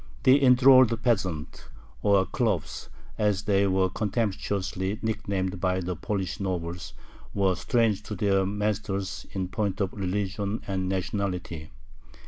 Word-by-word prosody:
The 135 +2 +5
enthralled 125 -3 +6
peasants, 95 -10 -1 0.4
or 100 -2 +4
khlops, 105 - -2 0.3
as 105 -1 +1
they 100 -1 +2
were 95 0 +2
contemptuously 100 -1 -2
nicknamed 95 -4 -2
by 90 0 +1
the 90 0 -3
Polish 95 +3 -3
nobles, 85 -4 -4 0.4
were 95 -2 +3
strange 110 +2 +1
to 105 - -5
their 95 0 +2
masters 100 -1 -2
in 95 -2 -2
point 100 0 -2
of 100 -2 -1
religion 100 +2 -2
and 95 -1 -1
nationality. 90 -4 -3
100 Hz, 120 wpm, -27 LUFS, 95-105 Hz, 0.4 s, enthralled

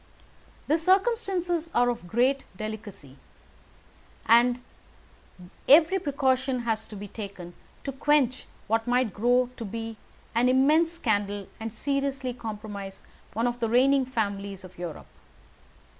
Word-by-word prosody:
"The 315 +3 +2
circumstances 370 -3 +1
are 245 0 +4
of 235 -7 -4
great 255 +7 +2
delicacy, 210 -10 -7 1.1
and 240 +2 +5 1.1
every 325 +6 +7
precaution 265 -4 0
has 220 -2 -2
to 215 - -10
be 205 +1 -7
taken 195 -4 -8 0.3
to 275 - -3
quench 270 -2 +1 0.2
what 225 +2 0
might 245 -4 +2
grow 245 +4 +2
to - - -5
be 225 +1 -5 0.4
an 240 +2 +3
immense 305 +6 +4
scandal, 205 - -1
and 225 0 -4
seriously 275 0 -1
compromise 210 -4 -7 0.3
one 230 +3 0
of 245 0 -1
the 230 -2 0
reigning 265 +2 +4
families 200 -5 -3
of 185 0 -12
Europe. 175 -3 -6
240 Hz, 125 wpm, -27 LUFS, 215-275 Hz, 1.1 s, every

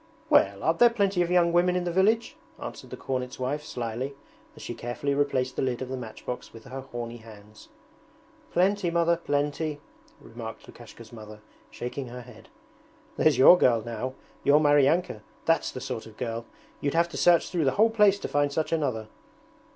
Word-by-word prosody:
'Well, 100 0 +4
aren't 165 +1 +1
there 240 - +8
plenty 200 -5 +1
of 175 - 0
young 175 -1 +3
women 180 +1 +3
in 180 - 0
the 175 - -2
village?' 210 +6 +2 0.2
answered - - -8
the - - -7
cornet's 125 -1 -4
wife 135 +4 -2
slyly 120 +3 -4 0.4
as - - -12
she - - -5
carefully 120 +4 -3
replaced 135 -3 0
the - - 0
lid 130 -2 -1
of 130 - -5
the 130 - -3
matchbox 125 0 -7
with 115 -1 -13
her 135 0 -7
horny 120 -2 -7
hands. 110 -2 -15 0.8
'Plenty, 190 +1 +2
Mother, 170 0 +2
plenty,' 145 -1 -2 0.4
remarked 115 -1 -9
Lukashka's 115 -1 -13
mother, 110 -1 -10 0.3
shaking 125 +2 -6
her 125 +1 -8
head. 115 -2 -15 0.7
'There's 155 -5 +3
your 175 +7 +8
girl 115 -3 +3
now, 120 +3 -4 0.3
your 145 +1 +5
Maryanka 145 -2 +3 0.2
that's 165 0 +2
the - - -7
sort 125 -4 -5
of 110 -1 -15
girl! 115 -1 -4 0.3
You'd 140 +2 -2
have 170 +1 +3
to - - -10
search 175 -1 +4
through 170 -5 0
the 135 - +2
whole 225 +2 +4
place 210 -3 +4
to - - -3
find 145 0 +1
such 155 +2 -2
another!' 130 -9 -1
135 Hz, 180 wpm, -27 LUFS, 120-170 Hz, 0.8 s, there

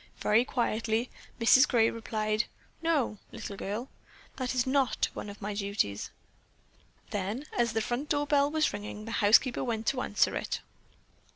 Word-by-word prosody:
Very 220 +3 +3
quietly 230 -1 -1 0.3
Mrs. 260 +4 +6
Gray 230 -3 +3
replied: 215 -1 -1 0.4
"No, 290 -11 +1
little 200 - -6
girl, 210 +6 -4 0.5
that 255 -1 -2
is 245 - +2
not 265 -1 +1
one - - -6
of 205 +1 -10
my 210 +1 -2
duties." 200 - -1 1.0
Then, 205 +7 -3
as 235 -2 +1
the 225 - +1
front 245 +6 -2
door 290 -1 +1
bell 285 -1 +3
was 310 0 +1
ringing, 210 +1 -6
the 225 - -6
housekeeper 225 +5 +5
went 225 -3 -2
to 255 +1 +1
answer 210 - +1
it. - - -3
230 Hz, 155 wpm, -30 LUFS, 210-260 Hz, 1.0 s, Mrs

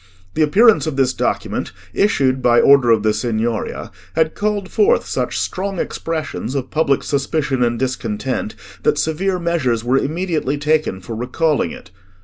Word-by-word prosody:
The - - -1
appearance 205 +5 +5
of 155 - -2
this 130 -2 +2
document, - - -2 0.2
issued 135 -10 +2
by 120 -1 +4
order 140 -3 +5
of 110 -2 +4
the 110 -1 +2
Signoria, 110 +1 -2 0.2
had 160 -1 +2
called 205 -2 -2
forth 450 +4 +3
such - - -2
strong 195 +1 -3
expressions 155 -6 -4
of 130 -2 -3
public 155 -3 +1
suspicion 140 -1 -1
and 120 -1 +1
discontent, 125 -2 -3 0.3
that - - +2
severe 180 +4 0
measures 155 -10 0
were 130 +3 +2
immediately 155 -2 -1
taken 150 -9 0
for 110 +5 -7
recalling 130 - 0
it. - - -11
140 Hz, 150 wpm, -19 LUFS, 120-165 Hz, 0.3 s, appearance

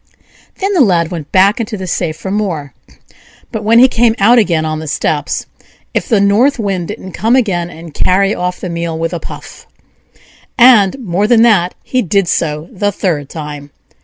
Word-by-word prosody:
Then 395 +1 -1
the 355 - +3
Lad 175 -7 +2
went 160 -4 -7
back 195 +5 +3
into 220 -2 -4
the 190 - -6
safe 165 -2 -2
for 190 - -6
more; 175 -9 -3 0.8
but 220 -3 -4
when 225 +2 +4
he 255 +2 +7
came 235 -2 +2
out 235 +5 +5
again 170 -7 +1
on 155 0 -3
the 160 - -7
steps, 150 0 -2 0.5
if - - -2
the 220 -5 +3
North 210 +8 +3
Wind 195 -6 -2
didn't 190 - -8
come 225 +8 +1
again 185 -9 0
and 165 -2 -11
carry 195 +5 +2
off 180 0 -3
the - - -5
meal 170 -1 -3
with 165 +2 -3
a 175 - -3
puff: - - -11 0.9
and, 240 -4 +5
more 205 -4 -1
than 230 -1 +4
that, 190 -7 +3
he 255 - -1
did 195 -1 0
so 150 -1 -1
the 205 +2 -1
third 155 -8 -2
time. 150 -2 -8
190 Hz, 190 wpm, -14 LUFS, 165-220 Hz, 0.9 s, he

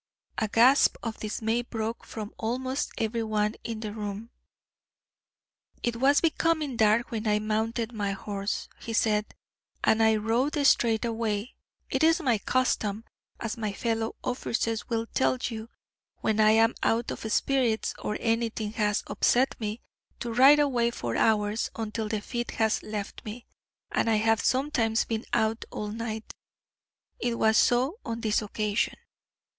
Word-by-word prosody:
A 220 - +1
gasp 245 +6 +5
of 230 -2 -4
dismay 220 +2 -1
broke 225 -1 -4
from 215 -2 -7
almost 255 +4 -2
every 225 +1 -1
one 215 -1 0
in 225 -2 -5
the 210 -2 -4
room. 210 +2 -5 1.5
"It 240 -1 -1
was 275 +4 +4
becoming 315 -4 +1
dark 220 +1 +3
when 225 -1 -3
I 210 0 +3
mounted 220 +2 -1
my 205 -2 -1
horse," 200 +1 -4
he 230 - -6
said, 215 -1 +1 0.5
"and 220 - +4
I 220 0 +5
rode 230 +7 0
straight 230 -4 +4
away; 225 -1 -2 0.4
it - - +1
is 325 +2 +5
my 250 -9 +1
custom, 225 -3 0 0.3
as 230 0 -4
my 215 -3 -2
fellow 225 +1 -2
officers 230 -2 -2
will 230 -1 0
tell 255 +2 +1
you, 225 -2 -4 0.5
when 220 0 +1
I 215 0 +6
am 225 +1 +4
out 230 +1 +1
of 220 - -5
spirits, 245 -3 +1
or 210 - -3
anything 225 -2 -1
has 210 -2 0
upset 255 +2 +2
me, 215 +2 -3 0.4
to 235 -1 -4
ride 270 +5 +7
away 255 -5 +2
for 120 - -4
hours 210 0 +2
until 220 -1 -3
the 215 -1 -1
fit 240 +2 -4
has 220 -1 +2
left 210 -2 -6
me, 225 +3 -8 0.5
and - - +1
I 225 - +4
have 225 +1 +2
sometimes 255 -4 +1
been 225 0 -3
out 220 +1 +1
all 210 - -4
night. 220 0 -5 0.9
It 240 -1 -1
was 220 -1 +3
so 260 - +3
on 230 -1 -4
this 215 -1 +1
occasion. 210 +1 -1
225 Hz, 150 wpm, -27 LUFS, 215-240 Hz, 1.5 s, ride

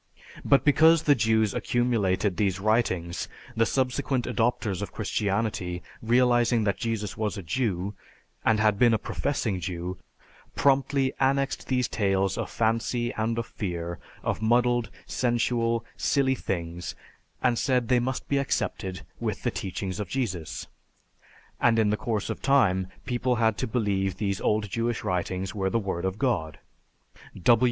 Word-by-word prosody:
"But 140 - +4
because 160 +3 +6
the 145 - +5
Jews 110 -4 +2
accumulated 105 -6 +1
these 95 -1 0
writings, 95 -5 0 0.3
the 115 0 +3
subsequent 130 -1 0
adopters 115 -4 0
of 100 -4 -4
Christianity, 100 -4 -1 0.2
realizing 120 0 +3
that 100 -1 0
Jesus 110 -3 -2
was 105 -1 -1
a 100 - -6
Jew, 100 0 -1 0.5
and 110 -1 +3
had 105 -2 +3
been 120 -2 +5
a - - +2
professing 110 -6 -2
Jew, 90 +1 -4 0.6
promptly 140 -1 +2
annexed 135 +1 +1
these 125 -2 +1
tales 95 -2 +1
of - - -3
fancy 115 +1 0
and 115 +1 -1
of 115 - -1
fear, 85 -5 -4 0.2
of - - -1
muddled, 120 0 +2 0.2
sensual, 115 -1 0
silly 135 -2 +2
things 85 -7 -4 0.5
and 125 -2 +3
said 125 -3 +1
they 125 0 +4
must 130 +2 -3
be 140 - +1
accepted 95 -8 -2 0.2
with - - -3
the - - +1
teachings 95 +1 -4
of 105 -4 -4
Jesus. 95 - -3 0.9
And 115 -1 +4
in 110 -2 +3
the - - +2
course 105 -2 -2
of - - -6
time, 95 -10 +3 0.2
people 125 0 0
had 110 -2 +2
to 130 - -1
believe 100 -5 0
these 100 -2 -1
old 105 0 +1
Jewish 115 +2 -2
writings 90 +1 -2
were 95 -2 0
the 115 - +1
Word 95 -5 -2
of 95 +1 -2
God." 105 - 0
110 Hz, 145 wpm, -27 LUFS, 95-125 Hz, 0.9 s, because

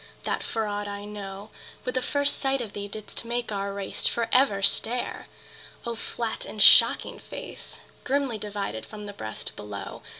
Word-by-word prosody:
that - - -1
for 225 -1 -1
aught 205 0 -2
I 200 0 -5
know, 205 0 -7 0.3
With 250 - -1
the 255 - +1
first 285 +2 +1
sight 270 0 +1
of 225 -5 -5
thee 205 0 -4
didst 215 +2 -6
make 240 0 -2
our 200 -1 -2
race 195 -1 -1
For 235 -1 0
ever 250 -7 +4
stare! 235 +4 +1 0.6
O 235 - -1
flat 230 0 -3
and 215 - -8
shocking - - +8
face, - - -9 0.2
Grimly 270 -5 0
divided 200 - -4
from 210 - -9
the 205 - -6
breast 110 - -5
below! 100 -1 -7
210 Hz, 170 wpm, -27 LUFS, 200-240 Hz, 0.6 s, shocking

